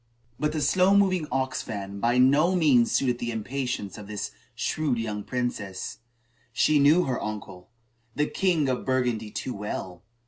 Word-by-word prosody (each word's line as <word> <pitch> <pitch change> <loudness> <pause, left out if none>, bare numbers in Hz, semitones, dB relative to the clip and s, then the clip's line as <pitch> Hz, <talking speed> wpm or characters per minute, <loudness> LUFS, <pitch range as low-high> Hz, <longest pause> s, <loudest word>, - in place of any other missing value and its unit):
But 150 +1 +1
the 155 - -1
slow 185 +6 +4
moving 185 -5 +2
ox 130 0 -1
wagon 100 -1 -5
by 120 +3 +2
no 145 +8 +4
means 140 -9 +4
suited 125 -3 +1
the 120 - -3
impatience 120 -2 -3
of 105 - -10
this 105 -1 -4 0.2
shrewd 150 -6 -1
young 105 -2 -3
princess. 110 -8 -4 0.5
She 155 -1 +3
knew 150 +6 +5
her 130 -5 -2
uncle, 95 -4 -6 0.5
the 150 - +2
king 170 -4 +1
of 130 -1 -1
Burgundy, 125 -4 0
too 125 +4 -4
well. 95 -3 -5
125 Hz, 160 wpm, -26 LUFS, 105-150 Hz, 0.5 s, knew